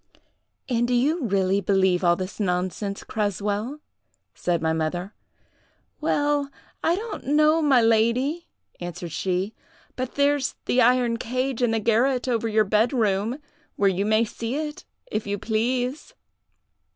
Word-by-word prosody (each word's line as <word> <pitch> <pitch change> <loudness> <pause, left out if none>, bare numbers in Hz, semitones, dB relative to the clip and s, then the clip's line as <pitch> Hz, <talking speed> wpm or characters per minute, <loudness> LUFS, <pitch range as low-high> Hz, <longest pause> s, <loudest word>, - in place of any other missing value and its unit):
"'And 240 -2 +1
do 245 - +1
you 285 +3 +1
really 195 0 +1
believe 190 -2 +2
all 175 -1 +4
this 185 +4 -6
nonsense, 185 +1 -2
Creswell?' 210 +6 -2 0.5
said 175 -1 -1
my 160 0 0
mother. 175 +5 -2 0.9
"'Well, 290 -2 +1 0.3
I 335 - +3
don't 425 - -6
know, 305 +3 +4
my 270 -6 +4
lady,' 235 +9 +2 0.3
answered 175 -1 -6
she; 185 +5 -1 0.4
'but 255 -1 -4
there's 285 -1 +1
the 250 - +3
iron 245 -1 +3
cage 255 +2 -2
in 245 - +3
the 225 0 +1
garret 245 +4 +2
over 230 -2 0
your 215 -1 +3
bed 215 +5 +2
room, 215 0 +1 0.4
where 200 -1 +3
you 195 +3 -1
may 220 +1 +3
see 230 +3 -4
it, 300 0 -4 0.3
if 215 - -2
you 205 0 -1
please. 245 +6 -2
230 Hz, 140 wpm, -24 LUFS, 200-260 Hz, 0.9 s, all